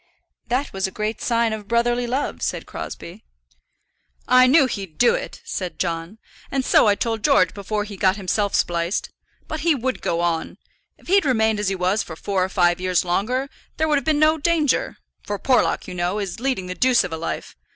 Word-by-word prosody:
"That 255 Hz, +4 st, -1 dB
was 190 Hz, 0 st, -1 dB
a -, -, -8 dB
great 215 Hz, +1 st, -2 dB
sign 230 Hz, -2 st, +1 dB
of 210 Hz, -2 st, -7 dB
brotherly 240 Hz, +1 st, +1 dB
love," 260 Hz, +4 st, -2 dB
said -, -, -2 dB
Crosbie. -, -, -8 dB, 1.0 s
"I 255 Hz, +1 st, +6 dB
knew 280 Hz, +2 st, +6 dB
he'd 195 Hz, -10 st, -5 dB
do 240 Hz, -, +5 dB
it," -, -, -5 dB
said 185 Hz, -, -4 dB
John; 170 Hz, +3 st, -3 dB, 0.3 s
"and 270 Hz, -1 st, -1 dB
so -, -, +5 dB
I 205 Hz, -, +4 dB
told 225 Hz, 0 st, -2 dB
George 185 Hz, -2 st, +4 dB
before 210 Hz, +1 st, -3 dB
he 205 Hz, -1 st, -9 dB
got 190 Hz, 0 st, +3 dB
himself 200 Hz, +1 st, -1 dB
spliced. 170 Hz, +2 st, -1 dB, 0.4 s
But 315 Hz, -, -4 dB
he 325 Hz, +1 st, +2 dB
would 255 Hz, 0 st, -2 dB
go 170 Hz, 0 st, -1 dB
on. 170 Hz, -2 st, -1 dB, 0.4 s
If -, -, -23 dB
he'd 390 Hz, +2 st, +4 dB
remained 220 Hz, -5 st, +2 dB
as 210 Hz, -2 st, 0 dB
he 195 Hz, -, -1 dB
was 185 Hz, +4 st, +1 dB
for 160 Hz, -, -7 dB
four 190 Hz, +2 st, -1 dB
or 185 Hz, -, -2 dB
five 175 Hz, -1 st, +2 dB
years 185 Hz, -1 st, +1 dB
longer 235 Hz, +10 st, 0 dB, 0.3 s
there 315 Hz, -, +1 dB
would 300 Hz, -2 st, +3 dB
have -, -, -11 dB
been 310 Hz, -2 st, +2 dB
no 310 Hz, +1 st, +3 dB
danger; 335 Hz, -, +1 dB, 0.2 s
for 205 Hz, -, -4 dB
Porlock, 250 Hz, +1 st, +1 dB
you 185 Hz, -, -6 dB
know, 180 Hz, +3 st, -1 dB
is 200 Hz, 0 st, -4 dB
leading 255 Hz, -7 st, -1 dB
the 180 Hz, -, -4 dB
deuce 250 Hz, +4 st, +3 dB
of 180 Hz, -3 st, -5 dB
a -, -, -3 dB
life. 165 Hz, -, -5 dB
215 Hz, 205 wpm, -22 LUFS, 185-255 Hz, 1.0 s, I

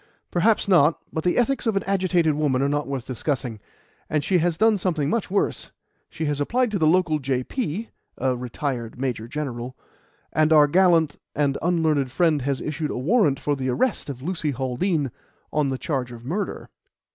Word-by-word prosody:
"Perhaps 205 Hz, +6 st, +2 dB
not. 165 Hz, -5 st, +5 dB, 0.2 s
But 160 Hz, -, -2 dB
the 180 Hz, -, +1 dB
ethics 245 Hz, +1 st, +1 dB
of 220 Hz, -, +1 dB
an 195 Hz, -, +1 dB
agitated 180 Hz, -5 st, +2 dB
woman 145 Hz, -3 st, +1 dB
are -, -, +2 dB
not 145 Hz, +1 st, -1 dB
worth 135 Hz, -3 st, -4 dB
discussing, 130 Hz, -3 st, -3 dB, 0.5 s
and 150 Hz, -1 st, 0 dB
she 180 Hz, +3 st, +2 dB
has 170 Hz, 0 st, +1 dB
done 220 Hz, 0 st, +4 dB
something 160 Hz, -6 st, 0 dB
much 230 Hz, -3 st, -1 dB
worse 200 Hz, +2 st, -1 dB, 0.4 s
she 160 Hz, -, -4 dB
has 145 Hz, -1 st, -1 dB
applied 245 Hz, -, +1 dB
to 200 Hz, -, -1 dB
the 155 Hz, -, +3 dB
local 165 Hz, -2 st, +3 dB
J.P. 150 Hz, -, -2 dB, 0.3 s
(a 130 Hz, 0 st, 0 dB
retired 125 Hz, -1 st, -4 dB
Major 125 Hz, -4 st, -2 dB
General), 130 Hz, -3 st, -5 dB, 0.6 s
and 155 Hz, 0 st, +3 dB
our 150 Hz, -2 st, +7 dB
gallant 165 Hz, -1 st, +3 dB, 0.2 s
and 145 Hz, -2 st, +1 dB
unlearned 160 Hz, -6 st, +1 dB
friend 160 Hz, -1 st, +2 dB
has 135 Hz, 0 st, -1 dB
issued 150 Hz, 0 st, -3 dB
a -, -, -3 dB
warrant 150 Hz, -, +2 dB
for 145 Hz, -, 0 dB
the 130 Hz, -1 st, -2 dB
arrest 215 Hz, -, 0 dB
of 130 Hz, -2 st, -7 dB
Lucy 165 Hz, -2 st, -2 dB
Haldean 135 Hz, +3 st, -1 dB, 0.4 s
on 150 Hz, -2 st, +2 dB
the 135 Hz, -1 st, -2 dB
charge 130 Hz, -4 st, -2 dB
of 120 Hz, 0 st, -10 dB
murder." 190 Hz, +9 st, -3 dB
150 Hz, 180 wpm, -24 LUFS, 135-180 Hz, 0.6 s, our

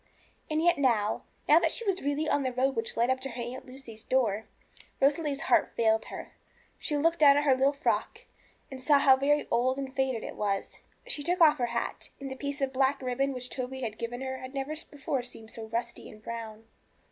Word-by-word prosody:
And 310 Hz, +1 st, 0 dB
yet 345 Hz, -3 st, +4 dB
now 225 Hz, -6 st, +1 dB, 0.2 s
now 305 Hz, +3 st, +7 dB
that -, -, +1 dB
she 465 Hz, -, -1 dB
was 390 Hz, -2 st, 0 dB
really 290 Hz, +2 st, -1 dB
on 290 Hz, -, +2 dB
the 260 Hz, -1 st, -1 dB
road 260 Hz, +2 st, +1 dB
which 225 Hz, 0 st, -3 dB
led 235 Hz, +2 st, +3 dB
up 260 Hz, -, 0 dB
to 270 Hz, -, -5 dB
her 240 Hz, 0 st, -6 dB
Aunt 250 Hz, +3 st, -7 dB
Lucy's 255 Hz, -4 st, -11 dB
door 220 Hz, -5 st, +1 dB, 0.5 s
Rosalie's 285 Hz, 0 st, +1 dB
heart 250 Hz, -, +2 dB
failed 220 Hz, -1 st, +3 dB
her. -, -, -8 dB, 0.5 s
She 295 Hz, -, -2 dB
looked 330 Hz, +3 st, +2 dB
down 285 Hz, -2 st, +7 dB
at 290 Hz, -, +2 dB
her 280 Hz, -3 st, +5 dB
little 270 Hz, +2 st, +3 dB
frock, 285 Hz, +2 st, -1 dB, 0.5 s
and 260 Hz, -1 st, -7 dB
saw 285 Hz, +2 st, +5 dB
how 270 Hz, -1 st, +6 dB
very 290 Hz, +2 st, +1 dB
old 255 Hz, +3 st, +2 dB
and 270 Hz, -1 st, -5 dB
faded 265 Hz, -4 st, 0 dB
it -, -, -6 dB
was. 200 Hz, -2 st, -2 dB, 0.2 s
She -, -, -3 dB
took 350 Hz, +5 st, 0 dB
off 310 Hz, -3 st, +6 dB
her 240 Hz, -, +1 dB
hat, 235 Hz, 0 st, -3 dB
and 275 Hz, -1 st, -6 dB
the -, -, -4 dB
piece 285 Hz, +1 st, -4 dB
of 270 Hz, -1 st, 0 dB
black 270 Hz, +1 st, +2 dB
ribbon 265 Hz, +2 st, 0 dB
which 250 Hz, -1 st, -5 dB
Toby 260 Hz, 0 st, -4 dB
had 220 Hz, -3 st, -4 dB
given 240 Hz, +2 st, -4 dB
her 260 Hz, 0 st, -4 dB
had 260 Hz, +2 st, -9 dB
never 275 Hz, +2 st, -2 dB, 0.2 s
before 280 Hz, -2 st, -2 dB
seemed 225 Hz, -2 st, -11 dB
so 225 Hz, -, -7 dB
rusty 235 Hz, +2 st, -4 dB
and 215 Hz, 0 st, -14 dB
brown. 225 Hz, -2 st, -6 dB
265 Hz, 220 wpm, -29 LUFS, 235-285 Hz, 0.5 s, now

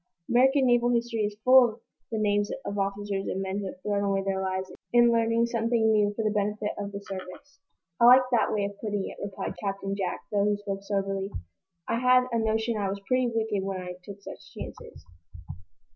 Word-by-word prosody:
American 265 Hz, +3 st, +4 dB
naval 240 Hz, -1 st, +3 dB
history 235 Hz, -1 st, 0 dB
is 205 Hz, 0 st, -5 dB
full 255 Hz, -3 st, +7 dB
of 230 Hz, -, -26 dB, 0.3 s
the 225 Hz, -, -1 dB
names 205 Hz, -1 st, +1 dB, 0.2 s
of 200 Hz, 0 st, -3 dB
officers 195 Hz, 0 st, -2 dB
and 190 Hz, -, -2 dB
men 195 Hz, +1 st, -2 dB
who 200 Hz, -, -4 dB
have 185 Hz, -, -8 dB
thrown 205 Hz, -1 st, 0 dB
away 195 Hz, -1 st, 0 dB
their 190 Hz, 0 st, -1 dB
lives 190 Hz, 0 st, -3 dB, 0.2 s
in 240 Hz, 0 st, +5 dB
learning 230 Hz, 0 st, +2 dB
something 230 Hz, -1 st, +1 dB
new 210 Hz, -1 st, +3 dB
for 225 Hz, -, -2 dB
the 215 Hz, -, +1 dB
benefit 210 Hz, 0 st, -1 dB
of 200 Hz, 0 st, -4 dB
the 200 Hz, -, -5 dB
service." 195 Hz, +10 st, -9 dB, 0.4 s
"I 235 Hz, -, +6 dB
like 255 Hz, +2 st, +9 dB
that 235 Hz, -3 st, +2 dB
way 205 Hz, -2 st, 0 dB
of 200 Hz, 0 st, -7 dB
putting 205 Hz, -3 st, -2 dB
it," -, -, -8 dB
replied 200 Hz, -1 st, -4 dB
Captain 195 Hz, 0 st, -2 dB
Jack, 190 Hz, -3 st, -3 dB
though 205 Hz, -1 st, +2 dB
he 205 Hz, 0 st, +1 dB
spoke 200 Hz, -1 st, -5 dB
soberly. 195 Hz, -1 st, -2 dB, 0.6 s
"I 230 Hz, -, 0 dB
had 255 Hz, 0 st, +5 dB
a 230 Hz, -, +1 dB
notion 220 Hz, +1 st, 0 dB
I 200 Hz, -2 st, -1 dB
was 200 Hz, +1 st, -4 dB
pretty 255 Hz, 0 st, +2 dB
wicked 220 Hz, -3 st, -1 dB
when 195 Hz, -1 st, -3 dB
I 180 Hz, 0 st, -6 dB
took 200 Hz, +1 st, -11 dB
such -, -, -10 dB
chances." 80 Hz, -, -9 dB
205 Hz, 205 wpm, -27 LUFS, 195-230 Hz, 0.6 s, like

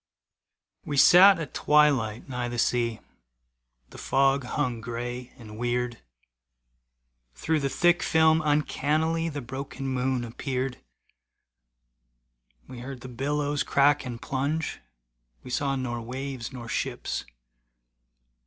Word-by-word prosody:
We 145 Hz, -, -4 dB
sat 185 Hz, +6 st, +8 dB
at 160 Hz, -5 st, -6 dB
twilight 140 Hz, -8 st, +2 dB
nigh 125 Hz, -2 st, -3 dB
the 120 Hz, 0 st, -5 dB
sea, 115 Hz, -1 st, 0 dB, 0.9 s
The -, -, -11 dB
fog 135 Hz, 0 st, +2 dB
hung 125 Hz, -3 st, -2 dB
gray 120 Hz, +2 st, -5 dB
and 110 Hz, -3 st, -11 dB
weird. 120 Hz, 0 st, -1 dB, 1.4 s
Through 155 Hz, -, 0 dB
the 140 Hz, -1 st, -1 dB
thick 175 Hz, +6 st, +3 dB
film 160 Hz, 0 st, +4 dB
uncannily 155 Hz, +2 st, +1 dB
The 145 Hz, -2 st, -5 dB
broken 135 Hz, +2 st, -6 dB
moon 130 Hz, -1 st, -1 dB
appeared. 125 Hz, +2 st, -3 dB, 1.9 s
We 125 Hz, -, -9 dB
heard 130 Hz, 0 st, -8 dB
the 130 Hz, -, -8 dB
billows 145 Hz, +3 st, -1 dB
crack 145 Hz, +1 st, +3 dB
and 120 Hz, -3 st, -6 dB
plunge, 145 Hz, +5 st, -2 dB, 0.6 s
We 125 Hz, -, -9 dB
saw 140 Hz, +1 st, 0 dB
nor 120 Hz, -3 st, -3 dB
waves 130 Hz, +1 st, -5 dB
nor 120 Hz, -3 st, -8 dB
ships. -, -, -3 dB
135 Hz, 115 wpm, -27 LUFS, 120-145 Hz, 1.9 s, sat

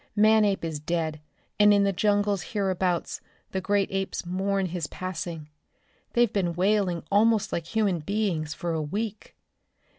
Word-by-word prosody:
Manape 210 Hz, -3 st, +4 dB
is 160 Hz, -2 st, -3 dB
dead, 155 Hz, -1 st, -2 dB, 0.4 s
and 210 Hz, 0 st, +7 dB
in 200 Hz, -1 st, +5 dB
the 200 Hz, 0 st, +2 dB
jungle 205 Hz, +1 st, +2 dB
hereabouts 185 Hz, -2 st, -1 dB, 0.3 s
the 190 Hz, -, -2 dB
great 200 Hz, 0 st, +1 dB
apes 195 Hz, -1 st, -3 dB
mourn 190 Hz, +2 st, 0 dB
his 175 Hz, -3 st, -3 dB
passing. 170 Hz, -3 st, -5 dB, 0.7 s
They've 240 Hz, -2 st, +3 dB
been 175 Hz, -4 st, 0 dB
wailing 185 Hz, -2 st, +1 dB
almost 215 Hz, +1 st, +3 dB
like 165 Hz, -1 st, -2 dB
human 205 Hz, -5 st, +1 dB
beings 170 Hz, -3 st, -1 dB
for 175 Hz, -, -3 dB
a 160 Hz, -1 st, -1 dB
week. 210 Hz, +7 st, -4 dB
190 Hz, 145 wpm, -26 LUFS, 170-205 Hz, 0.7 s, and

